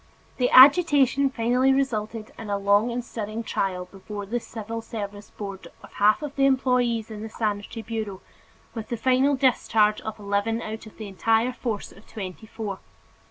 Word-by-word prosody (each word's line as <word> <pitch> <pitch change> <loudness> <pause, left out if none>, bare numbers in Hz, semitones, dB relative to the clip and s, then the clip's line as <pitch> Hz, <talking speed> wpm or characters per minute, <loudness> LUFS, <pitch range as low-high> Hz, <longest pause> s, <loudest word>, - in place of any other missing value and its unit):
The 250 -1 +2
agitation 280 -1 +6
finally 250 +1 +2
resulted 225 -5 -1
in 220 -2 -7
a 200 - 0
long 200 +3 +3
and 240 0 -3
stirring 220 0 -5
trial 185 -4 -2
before 200 +2 -8
the 235 +5 -2
civil 225 0 -6
service 205 -2 -7
board 195 -2 -8 0.2
of - - -14
half 210 +7 +3
of 290 -1 -5
the 275 0 +4
employees 250 -4 +1
in 210 -1 -7
the 220 - -6
Sanitary 215 +1 -3
Bureau, 215 -3 -4 0.5
with 225 -2 -6
the 235 - -2
final 260 +4 +3
discharge 225 -5 +2
of 220 - -6
eleven 205 +2 -1
out 220 -1 -6
of 215 - -15
the 215 - -7
entire 225 +5 +1
force 230 -5 -4
of 200 - -18
twenty 200 +1 -8
four. 210 -3 -5
225 Hz, 170 wpm, -25 LUFS, 205-245 Hz, 0.5 s, agitation